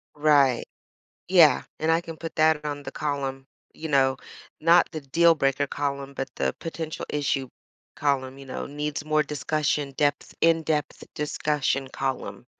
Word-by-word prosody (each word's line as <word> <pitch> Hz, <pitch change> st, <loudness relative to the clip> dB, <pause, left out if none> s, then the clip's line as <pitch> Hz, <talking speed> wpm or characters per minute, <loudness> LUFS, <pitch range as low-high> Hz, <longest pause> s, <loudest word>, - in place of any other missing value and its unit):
Right. 145 Hz, -4 st, +4 dB, 0.6 s
Yeah, 165 Hz, -7 st, +6 dB, 0.2 s
and 160 Hz, +1 st, +2 dB
I 165 Hz, +1 st, +3 dB
can 165 Hz, -2 st, -9 dB
put 165 Hz, 0 st, -7 dB
that 155 Hz, -1 st, +3 dB
on 145 Hz, -1 st, -4 dB
the -, -, -6 dB
column, 135 Hz, -2 st, -3 dB, 0.3 s
you 160 Hz, -, -6 dB
know, 135 Hz, -2 st, +3 dB, 0.4 s
not 165 Hz, +2 st, +5 dB
the 155 Hz, -2 st, -5 dB
deal 165 Hz, +5 st, +4 dB
breaker 135 Hz, 0 st, +1 dB
column, 140 Hz, -1 st, -3 dB
but 135 Hz, 0 st, -4 dB
the -, -, 0 dB
potential 160 Hz, -1 st, -5 dB
issue 140 Hz, -2 st, -1 dB, 0.5 s
column, 135 Hz, -2 st, -1 dB
you 140 Hz, -, -11 dB
know, 130 Hz, -, -5 dB
needs 150 Hz, 0 st, -4 dB
more 155 Hz, 0 st, +2 dB
discussion, 150 Hz, 0 st, -1 dB
depth 145 Hz, -1 st, 0 dB
in-depth 160 Hz, -3 st, +1 dB
discussion 150 Hz, -2 st, -1 dB
column. 135 Hz, 0 st, -4 dB
145 Hz, 150 wpm, -25 LUFS, 135-155 Hz, 0.6 s, Yeah